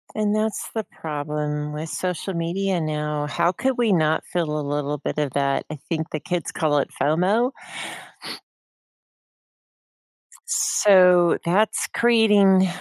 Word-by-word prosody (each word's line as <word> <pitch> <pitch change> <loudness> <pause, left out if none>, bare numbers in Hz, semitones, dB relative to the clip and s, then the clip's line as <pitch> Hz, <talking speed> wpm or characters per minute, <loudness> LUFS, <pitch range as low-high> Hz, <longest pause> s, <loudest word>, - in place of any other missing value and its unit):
And 210 -1 0
that's 215 0 -2
the 220 - -1
problem 150 -2 -4
with 155 +2 -5
social 185 +3 -3
media 175 +2 -1
now, 150 -1 -2
how 170 +3 +1
could 260 +8 -1
we 230 -5 +2
not 155 -2 +1
feel 155 -4 -2
a 145 - -4
little 145 0 -2
bit 145 - -5
of 145 -3 -1
that? 140 -1 0
I 155 - -5
think 160 -2 -2
the 155 - -4
kids 175 +1 -3
call 150 -3 +1
it - - -2
FOMO. 185 - +2 3.0
So, 180 - +4
that's 200 +6 +1
creating 210 -5 +4
170 Hz, 130 wpm, -23 LUFS, 150-195 Hz, 3.0 s, So